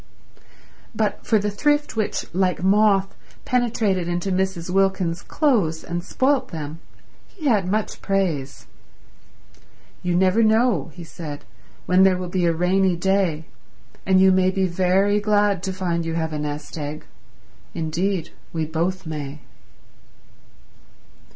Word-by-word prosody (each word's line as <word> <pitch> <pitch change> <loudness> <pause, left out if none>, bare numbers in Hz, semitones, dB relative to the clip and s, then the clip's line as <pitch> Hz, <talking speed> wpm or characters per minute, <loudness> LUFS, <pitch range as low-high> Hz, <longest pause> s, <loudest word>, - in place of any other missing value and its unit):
But 215 -1 -1
for 220 - +4
the 210 0 -1
thrift 295 +5 0
which, 215 -2 -1
like 180 -1 0
moth, 195 0 +3 0.3
penetrated 220 -7 0
into 175 +2 -2
Mrs. 185 -2 -1
Wilkins's 190 -3 +1
clothes 205 - +1
and 175 0 -4
spoilt 265 +8 +1
them, 155 -1 -7 0.5
he 330 -6 -11
had 205 -9 +2
much 215 +2 -2
praise. 170 -9 -1 1.4
"You 180 -1 -1
never 190 +4 +3
know," 220 - +2
he 175 - -8
said, 155 -3 -8 0.4
"when 180 +1 +4
there 190 -1 +5
will 180 -1 -5
be 180 -1 0
a - - +4
rainy 180 +2 +2
day, 175 -3 0 0.6
and 190 -1 +3
you 190 0 +6
may 185 0 +3
be 190 0 0
very 190 +3 +2
glad 205 -2 +2
to 190 0 -3
find 175 -3 -2
you 165 0 -3
have 160 -1 -2
a 150 - -3
nest 150 +2 -5
egg. 150 +1 -6 0.7
Indeed 170 +2 -2 0.2
we 160 -1 -2
both 170 +4 -2
may." 150 -2 -6
185 Hz, 135 wpm, -22 LUFS, 165-200 Hz, 1.4 s, you